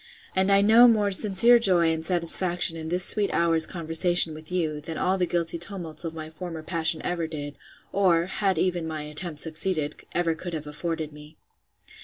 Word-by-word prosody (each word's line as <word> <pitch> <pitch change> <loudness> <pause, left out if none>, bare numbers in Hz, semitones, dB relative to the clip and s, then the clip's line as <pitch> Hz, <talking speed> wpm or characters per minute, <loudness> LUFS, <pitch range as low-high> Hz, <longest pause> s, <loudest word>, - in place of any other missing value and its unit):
And 190 +1 +2
I 200 0 +4
know 225 +4 +7
more 210 -3 +2
sincere 210 +5 +5
joy 175 -6 +3
and 160 0 -5
satisfaction 175 0 +1
in 160 -1 -7
this 180 +2 +2
sweet 205 -2 +3
hour's 165 -1 +2
conversation 170 0 +1
with 155 +2 -12
you, 160 -5 -2
than 160 +1 -7
all 185 +1 0
the 180 - 0
guilty 170 -1 -2
tumults 175 -3 -4
of 165 -1 -6
my 155 -1 -8
former 165 -1 -8
passion 160 -1 0
ever 170 -2 -2
did, 145 -2 -7 0.4
or 175 -4 +2
(had 195 +1 -1
even 175 -3 -1
my 155 -1 -5
attempts 150 +1 -6
succeeded) 160 -1 -1 0.2
ever 170 -2 0
could 170 +1 -7
have 155 -1 -6
afforded 155 0 -5
me. 150 +1 -15
170 Hz, 185 wpm, -25 LUFS, 160-185 Hz, 0.4 s, know